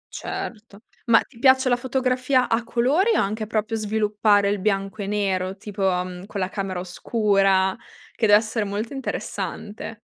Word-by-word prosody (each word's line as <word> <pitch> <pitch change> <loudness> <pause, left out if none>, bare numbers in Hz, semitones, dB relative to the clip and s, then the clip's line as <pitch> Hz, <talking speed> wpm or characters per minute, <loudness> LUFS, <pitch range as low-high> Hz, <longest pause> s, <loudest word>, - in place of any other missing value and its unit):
Certo. 230 - -6 0.2
Ma 235 -2 +6
ti 230 - -15
piace 260 0 +5
la 245 - +4
fotografia 255 0 +1
a 225 +1 +1
colori 270 - +2
o - - +3
anche 215 +2 -1
proprio 220 +1 -1
sviluppare 210 -1 +2
il 205 0 -1
bianco 195 +1 -1
e 195 - -4
nero, 195 -2 -1
tipo, 200 0 -8
mhmm, 180 +1 -4
con 205 - -5
la 185 -1 -1
camera 195 -2 -3
oscura? 195 0 +1 0.4
Che 225 - +1
dev'essere 215 +2 +3
molto 205 +5 -4
interessante. 220 -4 -5
215 Hz, 155 wpm, -23 LUFS, 195-235 Hz, 0.4 s, Ma